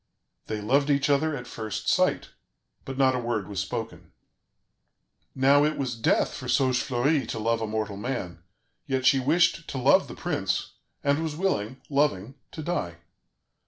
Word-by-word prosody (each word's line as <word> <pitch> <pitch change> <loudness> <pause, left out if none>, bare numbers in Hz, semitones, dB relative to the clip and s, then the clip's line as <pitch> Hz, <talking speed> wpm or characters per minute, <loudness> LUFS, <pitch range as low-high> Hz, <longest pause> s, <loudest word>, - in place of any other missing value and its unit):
They 110 -1 -3
loved 140 +7 +2
each 140 0 +2
other 155 +2 +2
at 125 - -8
first 110 -3 -5
sight, - - +2 0.6
but 135 -1 -6
not 135 -1 +4
a 125 - -1
word 115 -5 -2
was 100 -2 -4
spoken. - - -5 1.2
Now 140 +2 +5
it 150 +1 0
was 130 -3 -2
death 115 -1 +1
for 125 - -7
Saugefleurie 130 +2 +1
to - - -4
love 115 +1 0
a 110 - -2
mortal 105 -2 -3
man, 100 -7 -4 0.5
yet 130 -2 -1
she 135 - +5
wished 170 +5 +2
to 135 - -5
love 125 - +4
the - - -9
prince, - - -2 0.3
and 140 +2 +2
was 160 -2 -3
willing, 130 - -1
loving, 135 -6 0 0.2
to 155 - -7
die. 145 - -2
130 Hz, 160 wpm, -26 LUFS, 110-145 Hz, 1.2 s, Now